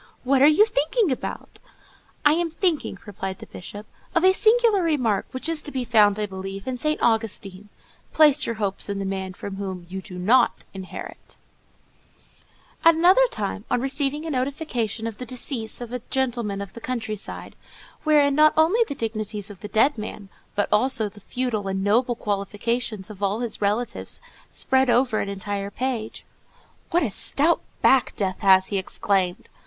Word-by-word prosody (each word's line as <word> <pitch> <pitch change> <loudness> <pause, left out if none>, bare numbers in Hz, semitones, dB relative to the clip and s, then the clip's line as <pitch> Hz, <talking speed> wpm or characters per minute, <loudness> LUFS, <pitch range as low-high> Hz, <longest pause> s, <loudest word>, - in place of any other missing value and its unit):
What 265 +1 +3
are 285 - +8
you 310 +8 +6
thinking 410 - +1
about?" 260 - -5 0.7
"I 295 - +7
am 340 +1 0
thinking," 325 - -1
replied 190 -2 -5
the - - -10
Bishop, 205 +3 -9 0.3
"of 335 - +3
a 375 - +7
singular 445 -1 +4
remark, 255 - +1
which 260 +4 -4
is 330 -2 0
to 295 - -6
be 260 -2 -2
found, 215 -4 +4
I 210 - 0
believe, 195 0 -7
in 260 - -2
St. 305 +5 -1
Augustine,—'Place 225 +7 +1
your 230 - -2
hopes 205 -2 -3
in 200 - -2
the 195 - -3
man 190 -1 -3
from 195 +1 -7
whom 190 -3 -5
you 190 +1 -5
do 185 -2 -10
not 235 +8 +3
inherit.'" 190 -1 -9 1.5
At 330 0 +7
another 370 +10 +5
time, 205 - -3
on - - +1
receiving 275 +3 -1
a 320 - -3
notification 255 -5 -2
of 225 -2 -5
the 250 - -5
decease 245 -3 -4
of 240 0 -7
a 250 - -3
gentleman 235 -6 -1
of 200 -1 -8
the 230 - -10
country 225 -4 -3
side, 205 - -7 0.5
wherein 295 -2 +4
not 305 +2 +5
only 350 +10 +4
the 280 - -5
dignities 215 -3 -4
of 195 - -12
the 210 - -7
dead 235 +4 +2
man, 210 -2 -7 0.3
but 205 - +1
also 220 0 +3
the 205 - -16
feudal 225 -2 -3
and 190 0 -2
noble 240 +4 +2
qualifications 210 +1 -2
of 205 -1 -12
all 200 +3 0
his 235 -3 -4
relatives, 210 +4 -2 0.3
spread 265 -1 +1
over 240 -2 +3
an 200 - -2
entire 200 0 -4
page: 240 0 -4 0.6
"What 345 0 +2
a 235 - -1
stout 305 - +2 0.2
back 265 -2 +4
Death 190 -2 -2
has!" 190 -2 +5
he 200 - 0
exclaimed. 190 -1 -1
230 Hz, 175 wpm, -24 LUFS, 200-280 Hz, 1.5 s, are